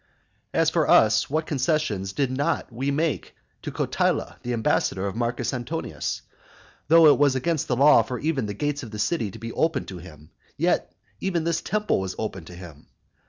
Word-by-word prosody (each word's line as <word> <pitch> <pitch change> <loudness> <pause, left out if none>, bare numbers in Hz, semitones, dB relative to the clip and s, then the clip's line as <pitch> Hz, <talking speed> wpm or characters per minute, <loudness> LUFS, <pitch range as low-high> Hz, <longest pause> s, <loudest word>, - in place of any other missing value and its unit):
As - - +2
for - - +1
us, 110 -1 +5
what 155 +3 0
concessions 135 - -1
did 135 +5 -1
not 140 -1 -1
we 130 +4 -2
make 155 +2 -1 0.3
to - - -5
Cotyla - - -1
the 125 - -4
ambassador 110 -4 0
of 100 - -3
Marcus 120 +3 -1
Antonius? 120 - -4 0.6
though 165 +2 +7
it - - -2
was 140 -2 +4
against 155 +3 -1
the 125 - +1
law 140 -1 +6
for 125 +3 -4
even 145 -5 -1
the 105 - -5
gates 145 +4 -2
of 120 - -8
the 105 - -7
city 110 0 0
to 95 - -10
be 115 +1 -7
opened 160 0 0
to 95 -3 -7
him, 75 -4 -14 0.3
yet - - +1 0.3
even 175 -4 -1
this 165 0 0
temple 210 - 0
was 95 -1 -4
opened 95 -6 -5
to 90 - -10
him. 85 -5 -12
125 Hz, 190 wpm, -25 LUFS, 105-155 Hz, 0.6 s, though